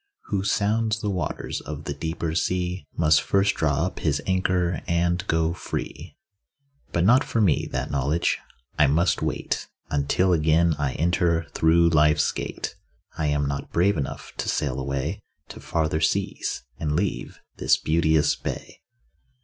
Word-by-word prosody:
Who 95 Hz, -2 st, 0 dB
sounds 110 Hz, +2 st, +1 dB
the 105 Hz, -2 st, -2 dB
waters 90 Hz, -5 st, -3 dB
of 75 Hz, 0 st, -7 dB
the 70 Hz, -, -3 dB
deeper 80 Hz, +2 st, -3 dB
sea 90 Hz, +2 st, -1 dB
Must 75 Hz, -2 st, +4 dB
first 100 Hz, +5 st, +2 dB
draw 75 Hz, +1 st, +1 dB
up 95 Hz, -, -5 dB
his 75 Hz, -2 st, 0 dB
anchor 90 Hz, -3 st, +1 dB
and 85 Hz, +1 st, +1 dB
go 80 Hz, 0 st, +1 dB
free. 90 Hz, -, -6 dB, 0.7 s
But 85 Hz, -, +1 dB
not 125 Hz, +6 st, +6 dB
for 115 Hz, -, -2 dB
me, 95 Hz, -9 st, +2 dB
that -, -, -3 dB
knowledge. 70 Hz, +4 st, +1 dB, 0.4 s
I 75 Hz, -, +6 dB
must 85 Hz, +6 st, +2 dB
wait -, -, -2 dB, 0.2 s
Until 75 Hz, +6 st, +2 dB
again 80 Hz, +1 st, +3 dB
I 70 Hz, -3 st, 0 dB
enter 85 Hz, 0 st, +1 dB
through 85 Hz, +1 st, +4 dB
life's 75 Hz, -1 st, +4 dB
gate. -, -, -5 dB, 0.4 s
I 80 Hz, -2 st, -1 dB
am 75 Hz, -1 st, +1 dB
not 70 Hz, 0 st, -4 dB
brave 95 Hz, +4 st, +3 dB
enough 70 Hz, -4 st, -5 dB
to -, -, -2 dB
sail 65 Hz, -3 st, -1 dB
away 70 Hz, 0 st, -2 dB, 0.3 s
To -, -, -9 dB
farther 80 Hz, -1 st, -1 dB
seas, 95 Hz, -, -1 dB, 0.2 s
and 75 Hz, -2 st, -1 dB
leave 95 Hz, +3 st, -2 dB, 0.2 s
this -, -, +3 dB
beauteous 80 Hz, -2 st, +2 dB
bay. -, -, -6 dB
80 Hz, 150 wpm, -25 LUFS, 75-90 Hz, 0.7 s, not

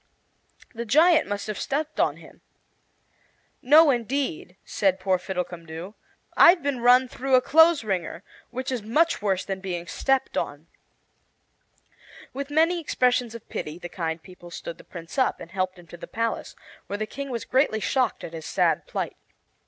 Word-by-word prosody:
"The 235 Hz, 0 st, -4 dB
giant 315 Hz, +8 st, +4 dB
must 205 Hz, 0 st, -3 dB
have 215 Hz, -1 st, -4 dB
stepped 300 Hz, +2 st, -3 dB
on -, -, +2 dB
him." -, -, -16 dB, 1.2 s
"No, 300 Hz, +3 st, +7 dB
indeed," 240 Hz, -, -2 dB
said 190 Hz, -2 st, +1 dB
poor 185 Hz, -1 st, +1 dB
Fiddlecumdoo, 175 Hz, -1 st, -6 dB, 0.4 s
"I've 345 Hz, -2 st, +7 dB
been 280 Hz, -3 st, -1 dB
run 250 Hz, +2 st, +5 dB
through 265 Hz, +1 st, 0 dB
a -, -, +7 dB
clothes 320 Hz, +1 st, +5 dB
wringer, 185 Hz, -3 st, -3 dB, 0.3 s
which 255 Hz, +2 st, -4 dB
is 250 Hz, -3 st, -2 dB
much 300 Hz, +10 st, +1 dB
worse 195 Hz, -3 st, 0 dB
than 195 Hz, -1 st, -4 dB
being 180 Hz, -3 st, -4 dB
stepped 270 Hz, +8 st, 0 dB
on." 145 Hz, +2 st, -5 dB, 1.7 s
With 280 Hz, +2 st, -5 dB
many 325 Hz, +4 st, +3 dB
expressions 250 Hz, -6 st, +1 dB
of 230 Hz, -, -10 dB
pity 155 Hz, +2 st, -5 dB
the 175 Hz, 0 st, -8 dB
kind 165 Hz, -2 st, -4 dB
people 180 Hz, -2 st, -13 dB
stood 170 Hz, 0 st, -8 dB
the -, -, -13 dB
Prince 170 Hz, +9 st, -7 dB
up 260 Hz, -, +1 dB
and 170 Hz, -, -10 dB
helped 185 Hz, -1 st, -2 dB
him 175 Hz, -, -14 dB
to 175 Hz, -, -12 dB
the -, -, -9 dB
palace, 230 Hz, 0 st, -3 dB, 0.3 s
where 205 Hz, -, -3 dB
the 215 Hz, -, -2 dB
King 275 Hz, +5 st, -7 dB
was 235 Hz, -3 st, -4 dB
greatly 260 Hz, -4 st, +2 dB
shocked 255 Hz, +2 st, 0 dB
at 165 Hz, -, -7 dB
his 160 Hz, -2 st, -7 dB
sad -, -, +1 dB
plight. -, -, -4 dB
225 Hz, 170 wpm, -25 LUFS, 180-270 Hz, 1.7 s, No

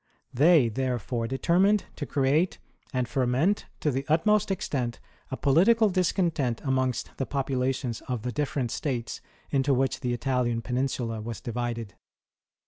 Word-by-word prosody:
They, 150 Hz, 0 st, +5 dB
therefore, 120 Hz, -1 st, -2 dB
determined 180 Hz, -, +2 dB
to 145 Hz, -, -4 dB
create 145 Hz, +6 st, +1 dB, 0.3 s
and 125 Hz, -3 st, -1 dB
ferment 135 Hz, -, +1 dB
to 150 Hz, -, +1 dB
the 135 Hz, +1 st, -2 dB
utmost 210 Hz, +7 st, +3 dB
extent 130 Hz, -10 st, -2 dB, 0.3 s
a 130 Hz, -, -4 dB
political 210 Hz, +10 st, +4 dB
discontent 170 Hz, -, +1 dB
amongst 130 Hz, -2 st, -1 dB
the 135 Hz, -, -2 dB
populations 130 Hz, -3 st, -1 dB
of 125 Hz, -4 st, -3 dB
the 125 Hz, -, -2 dB
different 135 Hz, -3 st, -2 dB
states 125 Hz, -6 st, -3 dB, 0.3 s
into 140 Hz, -1 st, +2 dB
which 135 Hz, +1 st, 0 dB
the 125 Hz, -3 st, -2 dB
Italian 120 Hz, -1 st, 0 dB
Peninsula 125 Hz, -3 st, -2 dB
was 115 Hz, 0 st, -5 dB
divided. 120 Hz, -2 st, -4 dB
130 Hz, 135 wpm, -27 LUFS, 120-150 Hz, 0.3 s, They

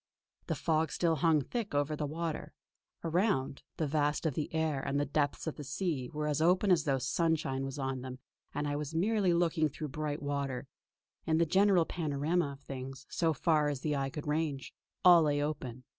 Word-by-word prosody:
The -, -, 0 dB
fog 160 Hz, -2 st, +1 dB
still 165 Hz, -2 st, +1 dB
hung 155 Hz, -1 st, +3 dB
thick 225 Hz, -, -4 dB
over 145 Hz, +1 st, +1 dB
the 150 Hz, 0 st, -2 dB
water. 160 Hz, +1 st, -4 dB, 0.5 s
Around, 165 Hz, -6 st, 0 dB, 0.2 s
the 160 Hz, -, 0 dB
vast 150 Hz, +1 st, 0 dB
of 155 Hz, -, +1 dB
the 150 Hz, +2 st, -3 dB
air 160 Hz, -4 st, 0 dB
and 140 Hz, +1 st, -1 dB
the 145 Hz, -, +1 dB
depths 145 Hz, 0 st, -1 dB
of 160 Hz, -, -4 dB
the 150 Hz, -, -6 dB
sea 140 Hz, -3 st, -2 dB
were 150 Hz, 0 st, -3 dB
as 150 Hz, 0 st, 0 dB
open 180 Hz, +4 st, +4 dB
as 165 Hz, -5 st, +4 dB
though 135 Hz, -3 st, +2 dB
sunshine 135 Hz, 0 st, 0 dB
was 135 Hz, +1 st, -5 dB
on 135 Hz, -2 st, -2 dB
them 130 Hz, 0 st, -7 dB, 0.3 s
and 150 Hz, -, -2 dB
I 145 Hz, -, -1 dB
was 150 Hz, +2 st, -4 dB
merely 200 Hz, +1 st, +2 dB
looking 170 Hz, -2 st, +2 dB
through 150 Hz, +2 st, -6 dB
bright 150 Hz, +1 st, -3 dB
water. 140 Hz, -2 st, -2 dB, 0.6 s
In 160 Hz, -1 st, +3 dB
the 170 Hz, -, +4 dB
general 190 Hz, 0 st, +4 dB
panorama 155 Hz, -1 st, -1 dB
of 140 Hz, -, -14 dB
things, 135 Hz, 0 st, -7 dB
so 165 Hz, -2 st, +2 dB
far 155 Hz, 0 st, +2 dB
as 140 Hz, -3 st, -3 dB
the 150 Hz, -2 st, 0 dB
eye 135 Hz, -1 st, -1 dB
could 145 Hz, +2 st, -6 dB
range, 150 Hz, -2 st, -2 dB, 0.3 s
all 175 Hz, -2 st, +9 dB
lay 145 Hz, -2 st, +2 dB
open. 130 Hz, -4 st, -3 dB
150 Hz, 200 wpm, -32 LUFS, 140-165 Hz, 0.6 s, all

